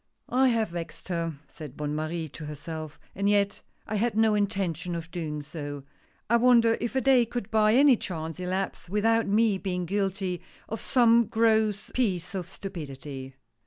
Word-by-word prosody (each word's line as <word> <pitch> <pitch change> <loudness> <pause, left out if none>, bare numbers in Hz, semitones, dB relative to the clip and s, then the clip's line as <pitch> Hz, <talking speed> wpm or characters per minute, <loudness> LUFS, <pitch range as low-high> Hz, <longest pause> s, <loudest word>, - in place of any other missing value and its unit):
"I 260 +1 +5
have 230 -3 +1
vexed 170 +2 -7
her," 165 -3 -2
said 150 -3 -10
Bonne 150 0 -2
Marie 155 +2 -2
to 155 +2 -9
herself 155 +1 -7
— - - -34
and 200 +1 +1
yet 200 -1 +2 0.2
I 215 - -2
had 225 +1 0
no 220 -1 +4
intention 195 -5 -1
of 165 0 -6
doing 150 -4 -4
so 145 -2 -6 0.2
— - - -38
I 235 - +4
wonder 235 -2 +5
if 235 +2 -3
a 265 - +2
day 255 -1 +5
could 235 -3 -5
by 215 0 +4
any 270 -2 +6
chance 165 -3 -5
elapse, 185 0 -3
without 225 +3 +2
my 210 -1 +3
being 180 -2 -2
guilty 195 -1 -1 0.3
of 225 - -5
some 235 -3 +4
gross 220 -2 +2
piece 190 -8 -1
of 180 -3 -4
stupidity 140 -8 -7
195 Hz, 175 wpm, -27 LUFS, 165-225 Hz, 0.3 s, any